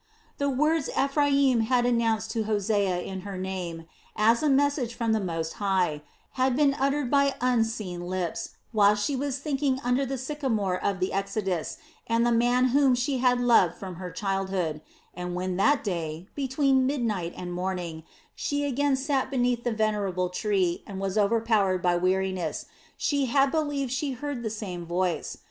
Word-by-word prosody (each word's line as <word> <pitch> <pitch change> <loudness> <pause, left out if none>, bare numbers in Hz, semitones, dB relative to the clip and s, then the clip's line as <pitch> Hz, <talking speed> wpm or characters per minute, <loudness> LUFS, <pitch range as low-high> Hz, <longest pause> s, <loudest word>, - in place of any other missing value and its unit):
The 280 0 +1
words 305 +3 +1
Ephraim 275 -2 +3
had 240 +2 +2
announced 225 -2 +1
to 225 -2 -1
Hosea 205 -3 +1
in 190 +1 -6
her 195 0 -6
name, 180 -3 -4 0.3
as 225 +2 +3
a 305 - +2
message 275 -3 +1
from 230 -1 0
the 220 - +2
Most 165 -4 -3
High, 185 -7 +1 0.3
had 260 -1 +1
been 285 0 +4
uttered 275 -1 0
by 280 -1 +3
unseen 225 -8 -1
lips 180 -2 -3 0.2
while 210 -2 +5
she 210 +7 -1
was 275 0 -2
thinking 280 -2 -1
under 250 +3 +1
the 270 0 -3
sycamore 245 -9 -2
of 200 -2 0
the 185 - -1
exodus 195 -3 -2 0.3
and 230 +1 +2
the 240 - +3
man 245 +2 +3
whom 270 0 +4
she 255 +2 -1
had 250 -1 +3
loved 230 -9 +4
from 185 -2 -8
her 180 0 -6
childhood 190 -6 -2 0.3
and 180 0 -5
when 185 0 -2
that 280 +9 +3
day, 170 -3 -4
between 265 -1 +2
midnight 220 -11 -1
and 180 -1 -5
morning, 180 -3 -3 0.3
she 290 0 -2
again 285 0 +1
sat 270 0 0
beneath 245 -3 0
the 240 - 0
venerable 205 -5 0
tree 185 -2 0
and 195 -2 -6
was 195 0 -2
overpowered 210 -2 +2
by 175 -1 +3
weariness, 185 -2 -1 0.3
she 285 -2 +1
had 275 +2 +3
believed 290 -5 -1
she 270 +1 -1
heard 275 0 -4
the 225 - -2
same 195 -5 -5
voice. 175 -1 -2
220 Hz, 165 wpm, -27 LUFS, 185-265 Hz, 0.3 s, while